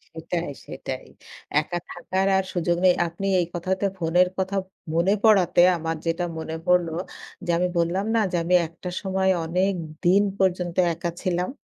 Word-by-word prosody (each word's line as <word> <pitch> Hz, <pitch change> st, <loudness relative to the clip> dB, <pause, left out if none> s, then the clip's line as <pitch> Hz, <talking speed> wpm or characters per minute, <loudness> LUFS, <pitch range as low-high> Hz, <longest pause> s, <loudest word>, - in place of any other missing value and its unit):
সেটাই, 165 Hz, 0 st, -3 dB, 0.2 s
সেটাই। -, -, -6 dB, 0.5 s
একা 175 Hz, +3 st, -4 dB
থাকার 190 Hz, +2 st, -1 dB
আর 190 Hz, -, +1 dB
সুযোগ 175 Hz, -1 st, 0 dB
নেই। 180 Hz, -, +7 dB
আপনি 170 Hz, +4 st, -4 dB
এই 175 Hz, -, +1 dB
কথাতে 185 Hz, +3 st, -1 dB
ফোনের 175 Hz, +1 st, +3 dB
কথা 190 Hz, +1 st, -1 dB, 0.4 s
মনে 170 Hz, +4 st, +3 dB
পড়াতে, 195 Hz, -6 st, +5 dB, 0.2 s
আমার 165 Hz, 0 st, -2 dB
যেটা 165 Hz, +1 st, 0 dB
মনে 160 Hz, 0 st, -4 dB
পড়ল 180 Hz, -1 st, +3 dB, 0.6 s
যে, 175 Hz, -, -7 dB
আমি 180 Hz, +1 st, +2 dB
বললাম 170 Hz, +4 st, +1 dB
না 225 Hz, -, +4 dB
যে, -, -, -1 dB
আমি 180 Hz, +2 st, +3 dB
একটা 170 Hz, +2 st, -8 dB
সময় 190 Hz, -1 st, +1 dB
অনেক 185 Hz, +4 st, +1 dB, 0.3 s
দিন 190 Hz, +4 st, +5 dB, 0.2 s
পর্যন্ত 180 Hz, -2 st, +1 dB, 0.2 s
একা 170 Hz, +1 st, -3 dB
ছিলাম? 180 Hz, -1 st, -1 dB
180 Hz, 160 wpm, -24 LUFS, 170-190 Hz, 0.6 s, নেই